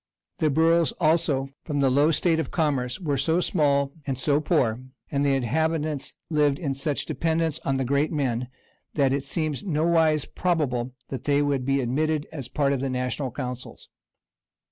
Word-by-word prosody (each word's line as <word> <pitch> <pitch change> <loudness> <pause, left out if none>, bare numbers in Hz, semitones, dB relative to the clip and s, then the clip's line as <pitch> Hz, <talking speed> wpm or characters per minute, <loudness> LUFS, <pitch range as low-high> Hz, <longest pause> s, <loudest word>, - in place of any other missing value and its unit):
The 155 - +2
boroughs 165 +1 +3
also, 155 -5 +1
from 145 -3 -2
the 135 -2 +3
low 145 +4 +4
state 165 +1 +2
of 160 - -2
commerce, 135 -7 0
were 145 -7 -1
so 160 +5 +2
small 140 -6 +2 0.2
and 135 -2 -1
so 145 +2 +2
poor, 130 -9 +1 0.3
and 140 0 +1
the 140 -1 +3
inhabitants 150 +3 -1
lived 150 -3 +2
in 140 -4 -2
such 140 +1 -2
dependence 160 -1 0
on 135 -1 -1
the 135 - -1
great 140 +4 +1
men,[] 125 -5 -1 0.5
that 135 -3 +3
it 140 0 -2
seems 155 +1 -2
nowise 160 -3 +2
probable 130 -9 -1 0.2
they 140 +2 0
would 140 -3 0
be 135 0 +2
admitted 150 +5 0
as 140 -6 -5
a - - -25
part 140 -2 +1
of 135 - -1
the 135 +1 -2
national 125 +1 -2
councils. 125 -1 -7
145 Hz, 170 wpm, -25 LUFS, 135-160 Hz, 0.5 s, low